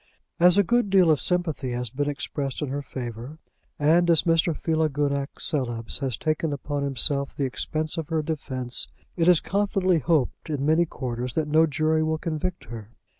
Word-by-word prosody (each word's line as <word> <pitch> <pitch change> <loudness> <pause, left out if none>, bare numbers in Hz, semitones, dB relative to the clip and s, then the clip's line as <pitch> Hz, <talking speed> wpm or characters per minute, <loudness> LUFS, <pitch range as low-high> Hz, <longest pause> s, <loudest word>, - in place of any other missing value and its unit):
As 180 +2 +6
a 200 - +6
good 240 +2 +1
deal 185 -4 +5
of 150 - +2
sympathy 160 -8 -1
has 120 -2 -3
been 145 +3 -1
expressed 140 0 -3
in 145 - -3
her 140 +2 -3
favour, 125 +1 -7 0.4
and 165 +4 +3
as 165 -2 +4
Mr. 165 -1 +2
Philogunac 145 -3 0
Coelebs 120 -6 -2
has 130 -6 -1
taken 155 0 -1
upon 145 0 -3
himself 140 0 +1
the 140 - -1
expense 155 +5 -3
of 160 -2 -4
her 160 -2 0
defence, 130 -5 -3 0.3
it 165 -1 +1
is 180 -3 +6
confidently 195 -3 +1
hoped 150 +1 0
in 145 -2 -2
many 160 +3 +3
quarters 125 -3 -4
that 155 -2 0
no 160 +2 +4
jury 155 +2 +1
will 160 0 0
convict 165 +3 -3
her. 110 -3 -9
150 Hz, 175 wpm, -25 LUFS, 135-165 Hz, 0.4 s, As